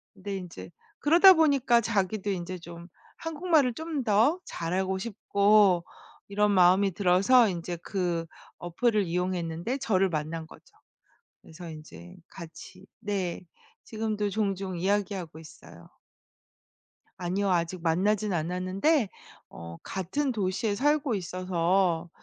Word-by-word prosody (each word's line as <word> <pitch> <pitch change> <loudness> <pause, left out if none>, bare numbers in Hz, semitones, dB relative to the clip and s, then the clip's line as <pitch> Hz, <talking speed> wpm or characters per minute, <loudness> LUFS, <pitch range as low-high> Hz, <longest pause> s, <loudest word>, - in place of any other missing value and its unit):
근데 195 0 -5
인제 165 - -9 0.3
그러다 345 +6 +7
보니까 275 -8 +3
자기도 205 -2 -1
인제 185 -1 -4
좀 170 +1 -11 0.3
한국말을 320 -5 +1
좀 320 - -7 0.2
더 230 - +3
잘하고 185 +3 -2
싶고 200 -3 +2 0.4
이런 210 +1 +1
마음이 190 +1 +4
들어서 195 +7 +4
인제 175 -1 -5
그 175 -4 -2 0.3
어플을 210 +5 0
이용했는데 180 +4 -2
저를 195 -7 +1
만난 160 0 -4
거죠. - - -16 0.8
그래서 170 +1 -11
인제 85 - -11
같이 165 -3 -12
네 195 -4 -3 0.4
지금도 215 -2 -3
종종 195 -3 -2
이야기하고 190 -4 -2
있어요. 85 - -15 1.3
아니요. 190 +2 -1
아직 175 0 -1
만나진 195 +5 +1
않았는데 185 - 0 0.4
어 85 0 -10
같은 260 - -2
도시에 205 -1 -1
살고 290 0 +1
있어서 180 -1 0
190 Hz, 260 characters per minute, -27 LUFS, 175-215 Hz, 1.3 s, 그러다